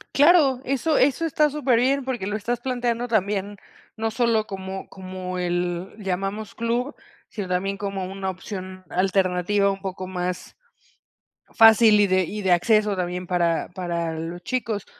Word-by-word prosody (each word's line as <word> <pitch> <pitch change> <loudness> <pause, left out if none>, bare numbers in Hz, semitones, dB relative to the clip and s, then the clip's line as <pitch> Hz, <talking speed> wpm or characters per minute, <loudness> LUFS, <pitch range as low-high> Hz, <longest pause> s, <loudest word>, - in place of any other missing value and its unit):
Claro. 290 -4 +5
Eso 275 +4 +1
eso 280 +4 +2
está 300 -1 +2
super 270 -5 +1
bien. 270 +3 +2
Porque 250 -7 -3
lo 210 - -2
estás 235 +3 -2
planteando 245 -1 -1
también, 205 -2 -1 0.4
no 220 0 -2
sólo, 225 -2 +1
como 190 -2 -6
como 185 -1 -6
el 175 +1 -2
llamamos 195 +2 -3
club, 240 +5 -1 0.3
sino 205 -4 -5
también, 195 +2 -1
como 195 -2 -3
una 190 +1 -4
opción 185 0 -7
alternativa, 190 +1 +1
un 195 0 -6
poco 185 -1 -5
más 180 -1 -4 1.0
fácil, 225 -1 +7
y 205 - +4
de 185 0 +3
y 210 +5 -5
de 190 -2 +1
acceso, 210 +4 +3
también 180 0 -3
para 170 -2 0
para 170 -2 -3
los 170 +2 -6
chicos. 225 -4 -2
195 Hz, 150 wpm, -24 LUFS, 185-235 Hz, 1.0 s, fácil